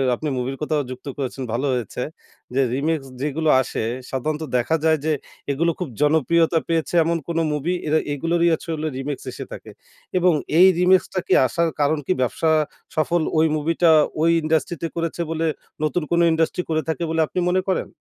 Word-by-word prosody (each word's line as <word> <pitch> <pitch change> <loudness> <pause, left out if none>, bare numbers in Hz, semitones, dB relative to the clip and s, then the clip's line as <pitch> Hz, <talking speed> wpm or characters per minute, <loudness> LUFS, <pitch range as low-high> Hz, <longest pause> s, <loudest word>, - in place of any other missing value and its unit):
আপনি 155 - -5
মুভির 130 +2 -3
কথাও 150 -1 0
যুক্ত 130 +2 -9
করেছেন 135 -1 -4
ভালো 130 +4 -1
হয়েছে। 125 0 -3 0.5
যে 135 - +4
রিমিক্স 145 0 -1
যেইগুলো 150 +2 0
আসে, 115 - -3 0.3
সাধারণত 150 +4 -2
দেখা 125 +7 +1
যায় 160 0 +4
যে 160 - +2 0.4
এগুলো 170 +5 +1
খুব 175 -6 -3
জনপ্রিয়তা 160 +3 +3
পেয়েছে 165 +1 0
এমন 165 +1 0
কোনো 165 -1 0
মুভি, 155 +5 -1
এরা 155 +1 +3
এগুলোরই 170 +4 +1
হচ্ছে 165 - -4
হলো 155 0 -2
রিমিক্স 135 +1 -4
এসে - - -7
থাকে। - - -9 0.5
এবং 180 -1 +4 0.3
এই 185 - +9
রিমিক্সটা 185 +1 +3
কি - - +3
আসার 165 +7 0
কারণ 150 +2 +2
কি 185 - +2
ব্যবসা 160 +6 0 0.5
সফল 165 +2 +1 0.2
ওই 160 - +5
মুভিটা 165 +3 +2 0.3
ওই 165 - +4
ইন্ডাস্ট্রিতে 160 +1 0
করেছে 165 0 -2
বলে 165 0 -1 0.4
নতুন 155 +3 0
কোনো 170 0 +4
ইন্ডাস্ট্রি 160 +2 +1
করে 155 0 +1
থাকে 160 +2 -1
বলে 165 0 -1
আপনি - - -3
মনে 185 - +2
করেন? 185 - -1
160 Hz, 175 wpm, -22 LUFS, 145-170 Hz, 0.5 s, এই